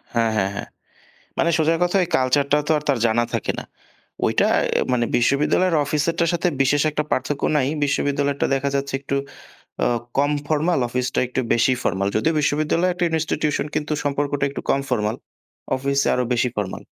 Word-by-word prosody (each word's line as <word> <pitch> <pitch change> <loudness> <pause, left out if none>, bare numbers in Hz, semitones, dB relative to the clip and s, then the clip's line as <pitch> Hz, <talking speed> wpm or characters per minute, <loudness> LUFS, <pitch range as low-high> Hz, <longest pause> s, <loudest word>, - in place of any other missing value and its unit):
হ্যাঁ, 115 -1 +2
হ্যাঁ, 95 0 +1
হ্যাঁ। - - -5 0.7
মানে 170 - +2
সোজা 160 +1 +3
কথা 175 +2 0
ওই - - -3
culture 130 +2 +2
টাও 150 - +4
তো - - +2
আর 150 - -5
তার 135 - +3
জানা 115 +1 +2
থাকে - - -1
না। - - -8 0.6
ওইটা - - +2 0.3
অ্যা - - +1
মানে 120 -1 +1
বিশ্ববিদ্যালয়ের 150 +8 +2
অফিসেরটার 165 +3 0
সাথে 170 +1 0
বিশেষ 140 +2 +3
একটা 150 0 -1
পার্থক্য 140 +2 -1 0.2
নাই। 130 -2 +2 0.2
বিশ্ববিদ্যালয়টা 140 0 0
দেখা 140 +1 -1
যাচ্ছে 140 0 -2
একটু 140 0 -3 0.7
আ - - +4 0.3
কম 145 +1 +3 0.2
formal 155 +1 +1
অফিসটা 125 +1 -1
একটু 130 +1 -2
বেশি 120 +2 +3
formal 100 +1 0
যদিও 160 +10 +2
বিশ্ববিদ্যালয় 155 +5 +1 0.3
institution 150 -1 -1
কিন্তু 150 0 -2
সম্পর্কটা 145 0 -1
একটু 140 - -6
কম 135 - +3
formal 105 +1 0 0.6
অফিসে 140 +1 0
আরো 125 - +1
বেশি 125 +1 +1
formal. 95 -2 -3
140 Hz, 170 wpm, -22 LUFS, 130-150 Hz, 0.7 s, টাও